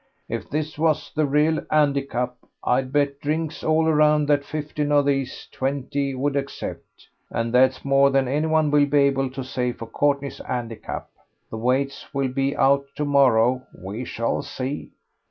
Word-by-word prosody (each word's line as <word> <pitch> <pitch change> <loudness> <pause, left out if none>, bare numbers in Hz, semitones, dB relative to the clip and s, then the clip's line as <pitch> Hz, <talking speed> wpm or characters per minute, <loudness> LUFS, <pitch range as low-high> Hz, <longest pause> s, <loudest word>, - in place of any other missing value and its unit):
If - - -5
this 155 0 -3
was 155 -2 +1
the 155 -1 +1
real 150 +3 +2
'andicap, 140 -4 +1 0.3
I'd 130 +1 +1
bet 140 -1 +1
drinks 155 +1 -2
all 160 +1 +2
around 150 -1 +4
that 145 -1 +3
fifteen 150 0 -3
of 145 -1 +4
these 135 -2 -1
twenty 140 +1 -2
would 140 +2 -1
accept. 140 0 -6 0.2
And 115 0 -2
that's 130 +2 +3
more 140 0 +5
than 135 -1 +2
anyone 155 +2 +1
will 145 -1 +4
be 145 0 +3
able 135 -1 +1
to 130 0 -6
say 125 -1 -2
for 115 - -8
Courtney's 140 +4 -1
'andicap. 120 -3 -5 0.5
The 110 - -4
weights 130 +4 -1
will 135 -1 +1
be 135 +2 -1
out 140 0 +3
to 150 - -1
morrow; 130 -3 +4 0.2
we 100 +6 -6
shall 115 -1 -2
see." 135 +3 -5
140 Hz, 160 wpm, -23 LUFS, 130-150 Hz, 0.5 s, more